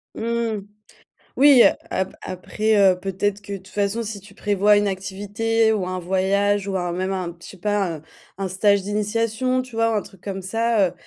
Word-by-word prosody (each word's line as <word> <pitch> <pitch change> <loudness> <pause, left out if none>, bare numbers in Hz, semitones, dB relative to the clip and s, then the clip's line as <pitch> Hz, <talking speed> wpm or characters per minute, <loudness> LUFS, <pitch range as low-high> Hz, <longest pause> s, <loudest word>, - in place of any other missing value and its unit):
Mmh. 230 -1 -1 0.8
Oui, 275 -2 +8
heu, - - +8 0.2
ap 190 0 -2
après, 215 +4 -1
heu, 190 -2 +5
peut-être 195 +2 -2
que 205 -1 -7
de - - -3
toute 190 0 -17
façon, 205 +4 -1
si 205 -2 -6
tu 200 0 -16
prévois 205 0 +3
une 205 0 +2
activité 205 +4 0
ou 200 -4 -1
un 185 0 -3
voyage 195 +2 +1
ou 190 -1 -1
un 175 -1 -2
même 185 +2 -2
un, 180 -3 -3
je - - -11
sais 195 - -11
pas, 195 -3 -1
heu, - - -14 0.4
un 195 - -2
stage 195 +1 +2
d'initiation, 230 +5 0
tu 255 -3 -12
vois, 230 0 +2
un - - 0
truc 190 -2 -16
comme 195 -1 -5
ça, 225 -1 +1
heu, - - -14
205 Hz, 200 wpm, -22 LUFS, 190-220 Hz, 0.8 s, Oui